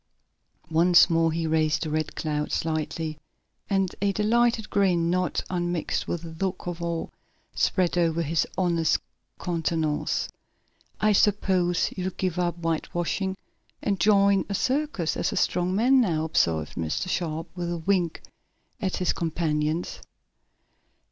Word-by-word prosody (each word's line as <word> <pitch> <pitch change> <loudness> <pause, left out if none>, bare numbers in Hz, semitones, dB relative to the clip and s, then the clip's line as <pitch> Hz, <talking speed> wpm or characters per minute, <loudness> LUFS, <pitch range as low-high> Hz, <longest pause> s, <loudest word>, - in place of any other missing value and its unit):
Once 170 +2 +6
more 165 0 +3
he 165 +1 -2
raised 155 0 +1
the 155 - -3
Red 155 0 -2
Cloud 150 -1 -2
slightly, 155 0 -2 0.5
and 195 -2 +1
a 200 0 +2
delighted 225 +2 +2
grin, 175 -4 +2
not 180 0 0
unmixed 175 -2 -2
with 170 -1 -3
a 165 -1 -8
look 185 -1 -2
of 175 -1 -5
awe, 170 -1 -2 0.5
spread 180 -3 +1
over 165 -1 +1
his 160 +1 0
honest 170 -4 +2 0.4
countenance. 160 -3 -1 0.7
"I 215 - +3
suppose 190 -4 +2
you'll 185 0 -3
give 185 -2 -1
up 175 -1 0
whitewashing 175 +3 -2 0.5
and 200 -2 0
join 200 0 +4
a 200 - -1
circus 260 - 0
as - - -1
a - - -3
strong 180 +1 +1
man, 255 +5 +5
now," 165 -8 +1
observed 80 - +1
Mr. 80 - -2
Sharp, 165 -2 -2
with 175 -1 -3
a 175 - -2
wink 175 -1 0 0.6
at 190 -3 -1
his 180 - +1
companions. 160 -1 -1
175 Hz, 135 wpm, -26 LUFS, 160-190 Hz, 0.7 s, Once